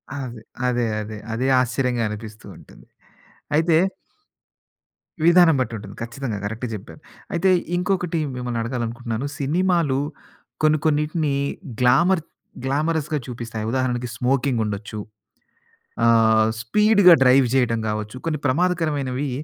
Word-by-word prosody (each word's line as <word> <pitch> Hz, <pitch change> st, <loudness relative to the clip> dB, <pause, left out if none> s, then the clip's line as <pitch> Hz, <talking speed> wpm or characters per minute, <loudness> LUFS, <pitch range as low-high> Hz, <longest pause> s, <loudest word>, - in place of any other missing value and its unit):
అదే. 125 Hz, -5 st, -6 dB, 0.3 s
అదే. 120 Hz, -1 st, +1 dB, 0.2 s
అదే. 105 Hz, 0 st, -7 dB, 0.2 s
అదే. 125 Hz, +4 st, -1 dB
ఆశ్చర్యంగా 125 Hz, -1 st, 0 dB
అనిపిస్తూ 110 Hz, 0 st, -8 dB
ఉంటుంది. -, -, -17 dB, 0.7 s
అయితే 160 Hz, 0 st, +3 dB, 1.5 s
విధానం 170 Hz, -2 st, +6 dB
బట్టి 120 Hz, -2 st, -1 dB
ఉంటుంది. 105 Hz, -, -10 dB
ఖచ్చితంగా. 115 Hz, -1 st, -4 dB
కరెక్ట్‌గా 115 Hz, +3 st, -4 dB
చెప్పారు. 105 Hz, +8 st, -11 dB, 0.3 s
అయితే 175 Hz, +2 st, +2 dB, 0.3 s
ఇంకొకటి 180 Hz, -2 st, -1 dB, 0.2 s
మిమ్మల్ని 125 Hz, -2 st, -3 dB
అడగాలనుకుంటున్నాను. 120 Hz, 0 st, -3 dB
సినిమాలు 165 Hz, -1 st, +1 dB, 0.6 s
కొన్ని 155 Hz, 0 st, +4 dB
కొన్నిటిని 150 Hz, 0 st, +1 dB, 0.5 s
గ్లామర్ 165 Hz, +9 st, +4 dB, 0.4 s
గ్లామరస్‌గా 150 Hz, +2 st, 0 dB
చూపిస్తాయి. 115 Hz, -3 st, -5 dB
ఉదాహరణకి 125 Hz, -2 st, -1 dB
స్మోకింగ్ 125 Hz, -1 st, 0 dB
ఉండొచ్చు. 105 Hz, +1 st, -5 dB, 1.1 s
ఆహ్, 110 Hz, -1 st, +5 dB
స్పీడ్‌గా 205 Hz, -, +5 dB
డ్రైవ్ 130 Hz, 0 st, +5 dB
చేయడం 115 Hz, -3 st, +2 dB
కావచ్చు. 105 Hz, +2 st, -4 dB
కొన్ని 155 Hz, -3 st, -1 dB
ప్రమాదకరమైనవి 145 Hz, -4 st, 0 dB
130 Hz, 105 wpm, -22 LUFS, 115-155 Hz, 1.5 s, విధానం